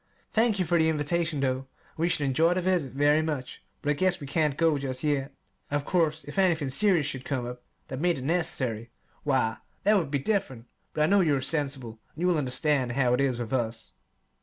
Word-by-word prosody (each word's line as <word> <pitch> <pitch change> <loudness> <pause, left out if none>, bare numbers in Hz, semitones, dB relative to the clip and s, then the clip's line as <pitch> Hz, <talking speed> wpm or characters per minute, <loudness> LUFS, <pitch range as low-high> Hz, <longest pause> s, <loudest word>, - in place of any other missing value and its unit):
Thank 225 -1 +3
you 185 - 0
for 170 +1 +2
the 160 0 +3
invitation, 160 0 -1
though, 130 -2 +1
and 135 - -10 0.3
we 165 +2 0
should 150 -4 0
enjoy 160 +6 +3
the 185 - 0
visit 175 -8 0
very 145 +3 +3
much; 150 -5 -4 0.2
but 145 - +1
I - - +3
guess 185 +4 +1
we 145 - -7
can't 150 0 0
go 165 -3 +2
just 130 -2 -4
yet. 145 -2 0 0.4
Of 145 0 -1
course 160 -3 +1
if 145 +6 -5
anything 165 -7 +2
serious 180 -1 +3
should 130 -3 -4
come 130 -4 -2
up 125 0 -7 0.3
that 130 +1 -5
made 175 -2 +2
it 130 - -6
necessary 130 -8 0 0.3
why, 130 -6 +1 0.3
that 210 +2 +4
would 170 -8 +1
be 140 - 0
different: 140 - -2 0.3
but 150 - +2
I - - +5
know 200 +5 +4
you 155 -5 +3
are - - 0
sensible, 135 -5 -1 0.2
and 170 +4 -2
will 175 -3 +3
understand 130 -1 +1
how 125 -2 +2
it 125 - +2
is 130 -3 +1
with 120 0 -5
us. 115 -3 -2
145 Hz, 220 wpm, -27 LUFS, 130-165 Hz, 0.4 s, I